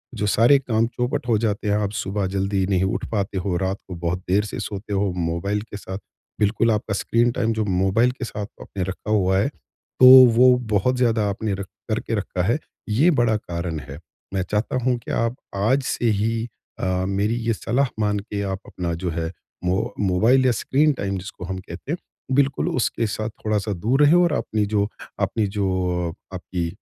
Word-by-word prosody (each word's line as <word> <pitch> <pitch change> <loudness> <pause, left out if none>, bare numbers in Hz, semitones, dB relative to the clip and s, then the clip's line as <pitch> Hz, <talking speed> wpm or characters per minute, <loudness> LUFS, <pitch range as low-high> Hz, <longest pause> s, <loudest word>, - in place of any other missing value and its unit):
जो 105 - -1
सारे 120 +7 +5
काम 115 -3 +1
चौपट 125 +1 -2
हो 115 -3 +3
जाते 105 -1 -1
हैं, 100 - +3
आप 105 -1 -1
सुबह 100 -1 -2
जल्दी 95 0 0
नहीं 95 -2 +2
उठ 95 - -1
पाते 100 -2 -1
हो, 90 -1 -1
रात 95 +1 -1
को 90 - -6
बहुत 85 +1 -2
देर 100 +3 +3
से - - -5
सोते 105 +1 -5
हो 100 -1 +1
मोबाइल 85 +5 -1
के 105 -2 -9
साथ 95 -1 -6 0.4
बिल्कुल 110 +2 +2
आपका 105 -1 -1
स्क्रीन 115 +4 +2
टाइम 115 -2 0
जो 110 -1 -1
मोबाइल 95 +6 +2
के 130 -1 -6
साथ 105 -2 -5 0.2
आपने 95 -2 -5
रखा 95 +3 -5
हुआ 95 -2 +3
है 105 - +2 0.5
तो 130 - +8 0.3
वो 125 +1 +7 0.2
बहुत 125 +6 +2
ज़्यादा 115 -4 +2
आपने 100 +1 -2
र 100 - -5 0.3
करके 115 +1 -1
रखा 100 -3 -2
है 115 +9 +2 0.3
ये 135 +12 +4
बड़ा 120 -6 +2
कारण 85 -4 -4
है। 70 +1 -9 0.3
मैं 95 - 0
चाहता 105 +6 -1
हूँ 125 -1 +2
कि - - -8
आप 115 +1 0 0.2
आज 115 +8 +2
से 120 -2 0
ही 115 +3 0 0.3
अ, 95 0 0
मेरी 100 +4 0
ये 115 - +3
सलाह 125 +5 0
मान 105 -1 +1
के 105 0 -5
आप 95 -1 -3
अपना 85 -2 -4
जो 90 - 0
है 80 +1 -3 0.3
मो 95 +3 0
मोबाइल 110 +7 +3
या 125 - +5
स्क्रीन 145 +7 +2
टाइम 100 -6 -3
जिसको 90 -1 -8
हम 95 +1 -4
कहते 115 +8 -8
हैं 175 - -1 0.4
बिल्कुल 140 0 +2
उसके 115 -2 0
साथ 110 +1 -3 0.2
थोड़ा-सा 105 -1 0
दूर 115 +10 +1
रहें 145 +2 +6
और 170 -3 +2
अपनी 110 -6 0
जो 100 -1 +1 0.3
अपनी 100 +2 0
जो 100 0 -1 0.7
आपकी 90 -1 -3
105 Hz, 195 wpm, -23 LUFS, 95-115 Hz, 0.7 s, तो